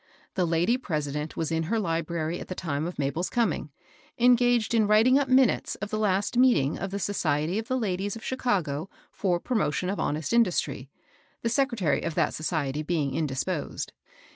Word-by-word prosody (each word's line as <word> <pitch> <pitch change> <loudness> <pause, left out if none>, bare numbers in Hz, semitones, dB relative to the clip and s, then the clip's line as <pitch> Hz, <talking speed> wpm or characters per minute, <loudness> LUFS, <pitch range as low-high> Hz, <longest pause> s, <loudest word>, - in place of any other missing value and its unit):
The 180 -2 +1
lady 170 +9 +2
president 150 - -3
was 165 0 -1
in 160 0 +1
her 230 - +1
library 165 -2 -2
at - - -8
the 185 - -5
time 155 -2 -2
of 175 - -7
Mabel's 145 +6 -1
connng, 220 - 0 0.5
engaged 245 -1 +4
in 220 -3 +3
writing 225 +6 +5
up 285 - 0
minutes 255 -3 +3
of 205 +1 -6
the 215 - -1
last 205 +1 +1
meeting 235 - +4
of 195 - -3
the 200 - -3
^^ - - -4
Society 175 -2 0
of 225 - -7
ike 260 - +2
Ladies 200 -1 -2
q£ - - -11
Chicago 195 - -1 0.2
for 180 -3 0
Prom^^cm 185 - 0
of - - -6
Honest 150 +1 -1
Lidustry," 180 - +1 0.6
the 230 - +1
secretary 235 - +1
of 165 -2 -3
that - - +1
society 150 -3 -2
being 155 -4 -1
indisposed. 150 +4 -2
185 Hz, 180 wpm, -27 LUFS, 155-225 Hz, 0.6 s, writing